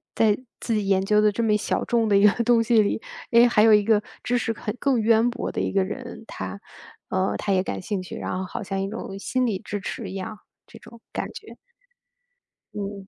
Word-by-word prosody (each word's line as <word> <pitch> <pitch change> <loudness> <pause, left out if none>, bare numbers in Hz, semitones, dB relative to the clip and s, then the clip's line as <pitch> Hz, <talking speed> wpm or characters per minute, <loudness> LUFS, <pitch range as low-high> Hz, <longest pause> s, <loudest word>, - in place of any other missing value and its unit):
在 215 -2 +4 0.2
自 230 - -2
己 210 -2 0
研 195 -1 +2
究 210 +1 +4
的 210 - +4
这 230 +3 -2
么 220 -2 +3
一 - - +4
小 210 - -1
众 230 -2 +1
的 200 - +5
一 200 +1 +7
个 225 +3 +2
东 235 0 +4
西 225 0 +4
里， 205 +1 0 0.3
诶， 235 +1 +6
还 210 -3 +3
有 220 0 +6
一 210 - +3
个 215 -1 +3 0.2
知 245 0 +1
识 230 - -1
很 210 0 -5
更 270 -4 +2
渊 225 +2 +4
博 240 - -4
的 - - -2
一 - - -1
个 195 -1 +2
人， 235 +4 -7
他 200 - -6 0.5
呃， 185 +1 0
他 200 - -1
也 185 -1 +2
感 - - -4
兴 190 0 -3
趣， 180 - -8
然 185 - -3
后 190 - -3
好 - - -6
像 195 0 -3
一 195 - -1
种 200 -2 -6
心 255 +5 -1
理 195 -4 -1
支 205 - -4
持 200 +1 -5
一 - - -7
样， 205 +3 -5 0.3
这 - - -13
种 235 - -15
感 - - -2
觉。 - - -11 1.2
嗯。 200 -1 -6
210 Hz, 255 characters per minute, -24 LUFS, 195-230 Hz, 1.2 s, 一